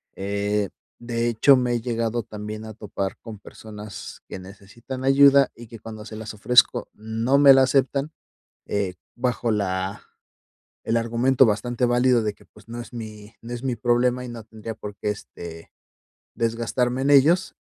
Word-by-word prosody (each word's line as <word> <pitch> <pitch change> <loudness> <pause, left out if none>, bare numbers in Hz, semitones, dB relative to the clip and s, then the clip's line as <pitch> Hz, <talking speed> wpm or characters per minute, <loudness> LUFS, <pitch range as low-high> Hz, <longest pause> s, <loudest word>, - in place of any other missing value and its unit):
Eh, 100 +1 -1 0.3
de 120 0 -2
hecho, 120 +4 +5
me 125 -1 0
he 120 - -1
llegado 115 -1 -1
también 105 0 -7
a 110 - -8
topar 100 -2 -4
con 110 -3 -9
personas 105 0 -10
que - - -7
necesitan 100 +7 -9
ayuda, 140 0 +6
y 120 - -12
que 115 0 -11
cuando 110 0 -9
se 110 - -9
las 110 0 -7
ofrezco 125 +4 +3
no 115 +5 0
me 140 -1 +9
la 135 0 +6
aceptan, 135 +2 +1 0.6
eh, 100 -3 -1 0.2
bajo 120 -1 -1
la 95 -1 -2 0.8
el 115 - +1
argumento 120 +3 +3
bastante 120 +3 0
válido 120 -1 +3
de 105 -1 -1
que, - - -22
pues, 105 0 -20
no 120 +1 -6
es - - -12
mi 110 -2 -9
no 120 +1 -7
es 120 +1 -6
mi 130 -2 -1
problema, 125 +1 +1
y - - -7
no 115 -2 -8
tendría 110 0 -8
por 105 -2 -8
qué, - - -2
este, 85 -5 -10 0.6
desgastarme 120 +2 -1
en 140 - +2
ellos. 155 +7 +4
115 Hz, 170 wpm, -24 LUFS, 105-125 Hz, 0.8 s, me